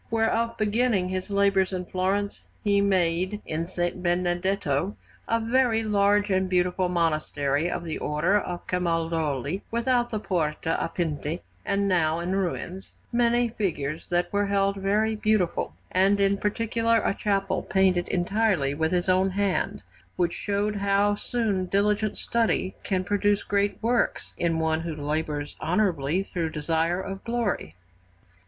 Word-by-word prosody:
Wherefore, 230 Hz, +1 st, +1 dB
beginning 215 Hz, -3 st, +1 dB
his 185 Hz, +1 st, -3 dB
labours 200 Hz, -1 st, +2 dB
in 180 Hz, -1 st, -3 dB
Florence, 195 Hz, +3 st, -1 dB, 0.2 s
he 200 Hz, -1 st, +3 dB
made 185 Hz, 0 st, +1 dB
in 160 Hz, +1 st, -2 dB
S. 185 Hz, -, -11 dB
Benedetto 175 Hz, -1 st, 0 dB, 0.3 s
(a 230 Hz, -, +2 dB
very 230 Hz, -1 st, +2 dB
large 205 Hz, -1 st, +2 dB
and 190 Hz, 0 st, +1 dB
beautiful 180 Hz, 0 st, +1 dB
monastery 155 Hz, -3 st, 0 dB
of 175 Hz, -, -3 dB
the 160 Hz, -2 st, -4 dB
Order 170 Hz, +7 st, +1 dB
of 175 Hz, -3 st, -5 dB
Camaldoli, 165 Hz, -3 st, -1 dB
without 240 Hz, +1 st, +1 dB
the 215 Hz, -, -2 dB
Porta 165 Hz, -4 st, -1 dB
a -, -, -2 dB
Pinti, 160 Hz, -1 st, -3 dB, 0.2 s
and 200 Hz, 0 st, 0 dB
now 165 Hz, -4 st, +2 dB
in 170 Hz, +2 st, -3 dB
ruins) 190 Hz, 0 st, -3 dB, 0.2 s
many 240 Hz, 0 st, +2 dB
figures 165 Hz, -9 st, -3 dB
that 175 Hz, +1 st, 0 dB
were 205 Hz, 0 st, +2 dB
held 200 Hz, 0 st, +1 dB
very 210 Hz, +3 st, +1 dB
beautiful, 210 Hz, -4 st, 0 dB, 0.2 s
and 195 Hz, +2 st, +3 dB
in 200 Hz, 0 st, +3 dB
particular 230 Hz, +2 st, +1 dB
a -, -, +1 dB
chapel 195 Hz, -2 st, 0 dB
painted 185 Hz, -2 st, +2 dB
entirely 185 Hz, -5 st, +1 dB
with 160 Hz, +2 st, 0 dB
his 180 Hz, 0 st, 0 dB
own 185 Hz, +1 st, +3 dB
hand, 195 Hz, -, -1 dB, 0.3 s
which 175 Hz, -1 st, +1 dB
showed 205 Hz, +1 st, -1 dB
how 200 Hz, +1 st, +2 dB
soon 205 Hz, -4 st, -1 dB
diligent 205 Hz, +2 st, +1 dB
study 225 Hz, -5 st, 0 dB
can 185 Hz, -1 st, 0 dB
produce 205 Hz, +1 st, +1 dB
great 200 Hz, 0 st, 0 dB
works 240 Hz, +1 st, 0 dB
in 165 Hz, -1 st, +1 dB
one 160 Hz, 0 st, +1 dB
who 165 Hz, -2 st, -4 dB
labours 150 Hz, 0 st, -3 dB
honourably 175 Hz, -2 st, +1 dB
through 170 Hz, -4 st, -3 dB
desire 165 Hz, +3 st, 0 dB
of 195 Hz, 0 st, -6 dB
glory. 230 Hz, -, -2 dB
190 Hz, 145 wpm, -26 LUFS, 170-205 Hz, 0.3 s, he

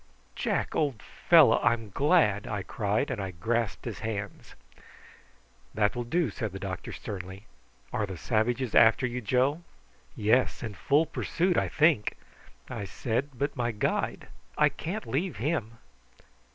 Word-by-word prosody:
"Jack, -, -, -1 dB
old 140 Hz, -7 st, 0 dB
fellow, 155 Hz, -9 st, +5 dB
I'm 115 Hz, -3 st, +1 dB
glad!" 140 Hz, -, +3 dB
I 105 Hz, -3 st, -3 dB
cried, 110 Hz, +8 st, -1 dB
and 120 Hz, -6 st, -3 dB
I 95 Hz, -, -3 dB
grasped 110 Hz, +4 st, -2 dB
his 115 Hz, -4 st, -5 dB
hands. 105 Hz, -3 st, -5 dB, 1.2 s
"That 105 Hz, -1 st, +2 dB
will 120 Hz, 0 st, -3 dB
do," 160 Hz, 0 st, 0 dB
said 110 Hz, -2 st, -4 dB
the 95 Hz, -, -6 dB
doctor 95 Hz, -2 st, -5 dB
sternly. 95 Hz, +1 st, -7 dB, 0.5 s
"Are 105 Hz, -, 0 dB
the 95 Hz, -2 st, -6 dB
savages 120 Hz, +4 st, 0 dB
after 115 Hz, +4 st, +6 dB
you, 125 Hz, 0 st, -3 dB
Joe?" 130 Hz, -, +1 dB, 0.5 s
"Yes, 120 Hz, +2 st, +2 dB
in 110 Hz, -3 st, -4 dB
full 145 Hz, -, +2 dB
pursuit, 180 Hz, +3 st, 0 dB
I -, -, +2 dB
think," 150 Hz, -8 st, +2 dB, 0.5 s
I -, -, -5 dB
said. 120 Hz, +7 st, -2 dB
"But 140 Hz, +2 st, -1 dB
my 120 Hz, -2 st, 0 dB
guide. 105 Hz, -, -2 dB, 0.3 s
I -, -, +5 dB
can't 200 Hz, +7 st, -5 dB
leave 170 Hz, +7 st, -2 dB
him." 115 Hz, -4 st, -2 dB
115 Hz, 145 wpm, -28 LUFS, 105-140 Hz, 1.2 s, after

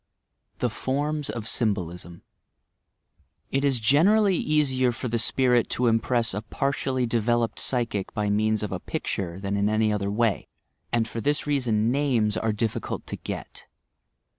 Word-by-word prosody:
THE 125 Hz, -, -1 dB
FORMS 145 Hz, +5 st, -2 dB
OF 115 Hz, -2 st, -4 dB
SYMBOLISM 90 Hz, -7 st, -2 dB, 1.3 s
It 135 Hz, +1 st, 0 dB
is 140 Hz, -3 st, +3 dB
generally 185 Hz, -, +4 dB
easier 135 Hz, -6 st, +2 dB
for 120 Hz, -, -5 dB
the 115 Hz, 0 st, -1 dB
spirit 125 Hz, +1 st, +2 dB
to 125 Hz, -, 0 dB
impress 115 Hz, -1 st, +1 dB
a 105 Hz, -, -2 dB
par 135 Hz, +5 st, -1 dB
tially 130 Hz, -2 st, -1 dB
developed 115 Hz, 0 st, 0 dB
psychic 115 Hz, -6 st, -1 dB
by 105 Hz, -1 st, 0 dB
means 110 Hz, +1 st, +1 dB
of 105 Hz, -, -3 dB
a 95 Hz, -, -3 dB
picture 90 Hz, 0 st, -4 dB
than 100 Hz, 0 st, -2 dB
in 100 Hz, +1 st, +1 dB
any 110 Hz, 0 st, +2 dB
other 100 Hz, -1 st, -1 dB
way, 110 Hz, -1 st, 0 dB, 0.4 s
and 115 Hz, -1 st, +1 dB
for 115 Hz, -, -5 dB
this 145 Hz, +3 st, 0 dB
reason 120 Hz, -6 st, +1 dB
names 125 Hz, -7 st, +1 dB
are 110 Hz, -, 0 dB
difficult 105 Hz, +1 st, -3 dB
to -, -, -5 dB
get. -, -, -7 dB
115 Hz, 155 wpm, -25 LUFS, 105-130 Hz, 1.3 s, generally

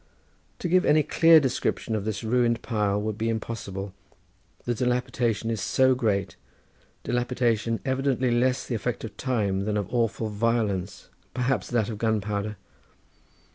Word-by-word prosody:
To -, -, -3 dB
give 180 Hz, +2 st, +4 dB
any 155 Hz, 0 st, +4 dB
clear 165 Hz, +1 st, +6 dB
description 130 Hz, -4 st, -1 dB
of 105 Hz, -2 st, -3 dB
this 110 Hz, 0 st, -3 dB
ruined 115 Hz, 0 st, +1 dB
pile 105 Hz, -3 st, 0 dB
would 105 Hz, +1 st, -3 dB
be 115 Hz, +1 st, 0 dB
impossible, 100 Hz, -4 st, -4 dB, 0.7 s
the 120 Hz, -, 0 dB
dilapidation 125 Hz, -2 st, 0 dB
is 110 Hz, -3 st, -2 dB
so 130 Hz, +6 st, +3 dB
great, 105 Hz, -6 st, -1 dB, 0.7 s
dilapidation 120 Hz, -2 st, 0 dB
evidently 130 Hz, -2 st, +1 dB
less 125 Hz, +2 st, +1 dB
the -, -, -4 dB
effect 115 Hz, +2 st, -2 dB
of 110 Hz, -, -7 dB
time 100 Hz, -7 st, -1 dB
than 105 Hz, 0 st, 0 dB
of 105 Hz, +3 st, -4 dB
awful 115 Hz, -2 st, 0 dB
violence, 105 Hz, -3 st, -1 dB, 0.3 s
perhaps 125 Hz, +2 st, 0 dB
that 115 Hz, -4 st, +1 dB
of 105 Hz, -2 st, -5 dB
gunpowder. 105 Hz, -1 st, -1 dB
115 Hz, 140 wpm, -26 LUFS, 105-125 Hz, 0.7 s, clear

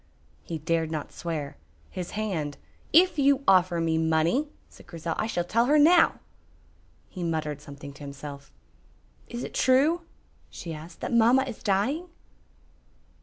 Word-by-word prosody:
He 165 Hz, -, -5 dB
dared 160 Hz, +1 st, -1 dB
not 155 Hz, -2 st, -4 dB
swear. 155 Hz, -4 st, -5 dB, 0.3 s
His 180 Hz, -2 st, -5 dB
hand 165 Hz, -10 st, -2 dB, 0.3 s
"If 350 Hz, 0 st, +5 dB
you 280 Hz, 0 st, +3 dB
offer 180 Hz, -2 st, +4 dB
me 165 Hz, -1 st, +1 dB
money," 160 Hz, -, +2 dB, 0.2 s
said -, -, -18 dB
Grizel, 165 Hz, 0 st, -4 dB
"I 220 Hz, -, 0 dB
shall 175 Hz, -6 st, -1 dB
tell 230 Hz, +7 st, +2 dB
her 300 Hz, +2 st, +4 dB
now." 325 Hz, +3 st, +5 dB, 0.9 s
He 180 Hz, -, -7 dB
muttered 155 Hz, -3 st, -2 dB
something 140 Hz, -1 st, -10 dB
to 140 Hz, -, -16 dB
himself. 140 Hz, -, -9 dB, 0.8 s
"Is 240 Hz, +1 st, -6 dB
it -, -, -7 dB
true?" 285 Hz, +7 st, +3 dB, 0.5 s
she 165 Hz, -, -7 dB
asked, 160 Hz, +2 st, -11 dB
"that -, -, -3 dB
mamma 235 Hz, +3 st, +5 dB
is 250 Hz, -5 st, -7 dB
dying?" 250 Hz, -, 0 dB
175 Hz, 145 wpm, -27 LUFS, 155-255 Hz, 0.9 s, If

